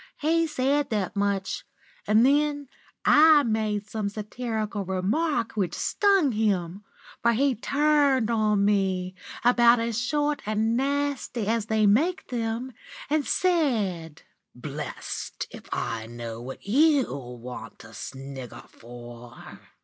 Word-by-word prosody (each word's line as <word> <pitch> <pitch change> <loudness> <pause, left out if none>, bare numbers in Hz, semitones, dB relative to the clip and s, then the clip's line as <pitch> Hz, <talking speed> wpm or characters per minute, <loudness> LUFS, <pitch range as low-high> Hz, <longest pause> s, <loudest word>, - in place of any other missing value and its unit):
"He 330 +2 +2
said 280 0 0
that 210 -4 -2
much, 200 -1 -1 0.4
and 215 +3 +5
then 290 0 +1 0.4
I 305 -1 +7
made 215 -3 -1
some 215 -1 -3
satirical 215 0 -4
remark 220 - 0
which 195 -5 -2
stung 390 -9 +2
him, 200 -4 -1 0.4
for 235 0 +3
he 270 +4 +2
turned 280 -1 +2
on 210 -3 +2
me, 190 -3 +1 0.3
about 240 -1 +6
as 230 0 -1
short 295 +3 0
and 220 +2 +1
nasty 280 -3 -1
as 225 0 0
they 220 -1 +2
make 275 - +2
'em, 235 +2 -2 0.4
and 305 -2 +1
said: 215 - 0 0.3
"'Blest - - -6
if - - -12
I 115 -1 -3
know 115 -1 -7
what 130 +2 -9
you 285 +5 +4 0.3
want 120 -1 -9
to 115 0 -14
snigger 135 +2 -8
for! 120 0 -12
220 Hz, 120 wpm, -26 LUFS, 195-280 Hz, 0.4 s, I